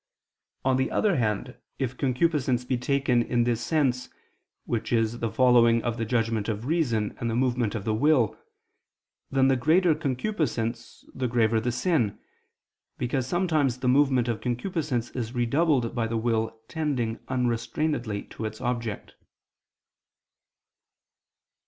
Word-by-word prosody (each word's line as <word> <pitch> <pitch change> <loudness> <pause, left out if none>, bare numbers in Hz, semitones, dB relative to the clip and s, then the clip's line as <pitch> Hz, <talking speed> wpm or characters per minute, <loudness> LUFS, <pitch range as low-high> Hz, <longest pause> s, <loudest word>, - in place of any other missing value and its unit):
On 130 -1 +3
the 130 - 0
other 205 -7 +1
hand, 115 +1 -1 0.2
if 130 -2 -2
concupiscence 130 -2 +1
be 130 - 0
taken 125 -1 +1
in 120 0 +1
this 120 -1 0
sense 130 -6 0 0.6
follows 115 0 0
the 115 0 +3
judgment 115 -3 0
of 110 +1 -3
reason, 125 -9 0
and 115 - -2
the 115 - -1
movement 120 -3 0
of 105 -2 -4
the 110 - +1
will, 125 -1 +3 0.9
then 135 -1 +3
the 135 - +4
greater 160 +7 +3
concupiscence, 130 - -3
the 130 -1 -2
graver 115 -2 +2
the 120 +2 -1
sin: 120 - 0 0.8
because 125 +1 -1
sometimes 155 -7 +1
the 125 - -3
movement 130 -2 +3
of 115 -2 -2
concupiscence 125 -1 -2
is 120 -1 -5
redoubled 125 0 +1
by 115 -2 -1
the 115 0 -2
will 115 -1 -1
tending 135 -8 -2
unrestrainedly 125 -2 -1
to 110 - -5
its 110 0 -5
object. 120 -4 -3
125 Hz, 125 wpm, -26 LUFS, 115-135 Hz, 0.9 s, the